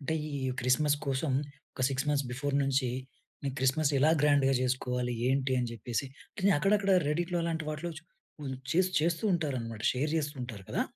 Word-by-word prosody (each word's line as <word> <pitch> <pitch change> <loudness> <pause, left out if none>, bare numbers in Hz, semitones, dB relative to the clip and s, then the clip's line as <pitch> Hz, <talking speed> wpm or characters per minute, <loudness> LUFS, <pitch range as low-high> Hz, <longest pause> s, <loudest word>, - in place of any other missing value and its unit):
అంటే, 150 +3 -2 0.2
ఈ - - -5 0.2
క్రిస్మస్ 145 +4 +3
కోసం 135 +2 0 0.4
ఒక, - - -9
6 135 +1 -2
మంత్స్ 145 -2 +1
బిఫోర్ 140 +3 -2
నుంచి, 135 -2 +1 0.5
నేను 135 -2 -2
క్రిస్మస్ 140 +3 +2
ఎలా 150 +4 +5
గ్రాండ్‌గా 140 -2 +4
జేసుకోవాలి, 125 -1 -1
ఏంటి, 135 0 +1
అని 120 -1 -2
చెప్పేసి 120 +3 -3 0.5
అక్కడక్కడ 200 +2 +2 0.2
రెడ్‌‌‌ఇట్‌లో 175 +3 0
అలాంటి 165 -1 -2
వాటిలో 155 +3 -4 0.5
హ్మ్, 135 -2 -4 0.2
చే 170 - +2 0.2
చేస్తూ 170 +5 0
ఉంటారన్నమాట. 125 -9 -3
షేర్ 140 +4 -1
చేస్తూ 150 -1 -1
ఉంటారు 110 -6 -7
కదా! - - +1
140 Hz, 160 wpm, -30 LUFS, 130-155 Hz, 0.5 s, ఎలా